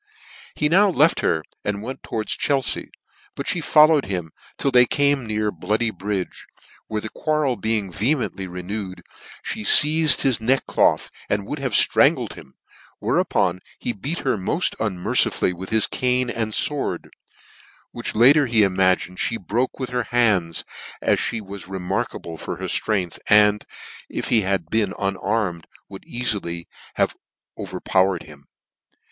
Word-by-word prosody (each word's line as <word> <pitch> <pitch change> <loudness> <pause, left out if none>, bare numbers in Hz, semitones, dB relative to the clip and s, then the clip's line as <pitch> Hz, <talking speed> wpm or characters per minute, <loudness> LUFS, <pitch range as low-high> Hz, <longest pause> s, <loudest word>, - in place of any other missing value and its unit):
He 150 - +1
now 195 +6 +4
left 165 -2 +3
her, 80 -1 0 0.2
and 105 0 -3
went, 130 +3 -7
towards 110 -1 -3
Chelfea: 135 -3 0 0.5
but - - -2
(lie 175 - -3
followed 155 -1 +5
him 90 -4 -4 0.3
:ill 140 - +2
they 125 -1 +6
came 140 -4 +1
near 105 -1 -1
Bloody 105 +7 -1
Bridge, 95 -1 -5 0.4
where 110 -1 -3
the 110 - -6
quarrel 150 -3 -1
being^ehement 110 - -1
ly 95 - -4
renewed, 95 +2 -6 0.5
me 110 - -7
feized 155 +7 +7
his 130 -3 +2
neckcloth, 130 +4 +1 0.2
and 100 -1 -1
would 145 +7 -5
have 135 -4 -3
fhrangled - - +3
him; 65 - -14 0.4
whereupon 90 0 0 0.2
he 120 - -3
heat 160 +5 -2
her 130 -6 0
moil 160 - -2 0.2
unmercifully 95 -3 +1
both 90 - -10
with 95 - -6
his 110 -1 +4
cane 125 -1 0
and 110 -2 -3
Iv/ord, 145 -2 -4 0.8
which - - -5
latter 135 +5 +5
he 115 -3 +3
imagined 95 -1 +1
Ihe 115 - -3
broke 120 +7 -2
with 130 -2 -5
her 125 -2 -1
hands, 100 -9 +1 0.4
as - - +1
me 115 - -4
was 100 -2 -9
remarkable 90 -3 -4
for - - -5
her - - -6
ftrength, 95 -6 -1
and, 105 0 +5 0.4
if - - -4
he 115 - +3
had 95 -4 -2
been 110 -3 0
unarmed, 95 -3 -2 0.2
could 95 - -10
have - - -18
eaiiiy 100 -9 -2 0.9
over - - -6
powered 95 -2 +1
him. 70 -2 -16
110 Hz, 150 wpm, -22 LUFS, 95-125 Hz, 0.9 s, feized